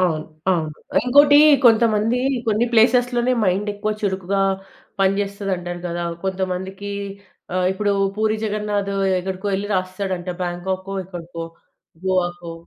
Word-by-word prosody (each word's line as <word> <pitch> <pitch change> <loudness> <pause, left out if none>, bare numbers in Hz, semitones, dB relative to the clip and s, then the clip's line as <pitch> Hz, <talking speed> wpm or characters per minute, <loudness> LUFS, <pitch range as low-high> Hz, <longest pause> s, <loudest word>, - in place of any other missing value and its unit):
అవును. 160 -4 +1 0.3
అవును. 165 -4 0 0.3
ఇంకోటి 285 +3 +6 0.3
కొంతమంది 225 0 +4 0.3
కొన్ని 220 +2 +2
ప్లేసెస్‌లనే 245 +2 +3
మైండెక్కువ 205 +3 -1
చురుకుగా 195 -1 0 0.6
పనిజెస్తది 195 0 0
అంటారు 175 0 -6
గదా! 175 0 -3 0.2
కొంతమందికి 190 +1 -3 0.6
ఆహ్, 185 0 +1
ఇప్పుడు 205 +1 0 0.2
పూరి 215 0 +1
జగన్నాథ్ 210 -1 -1 0.3
ఎక్కడికో 190 +2 -4
ఎళ్లి 200 +2 -2
రాసేస్తడంట. 185 -1 -3
బ్యాంకా‌కొ 185 +2 -3
ఎక్కడికో 175 -2 -8 0.6
గోవకో. 175 -2 -1
195 Hz, 105 wpm, -21 LUFS, 180-210 Hz, 0.6 s, ఇంకోటి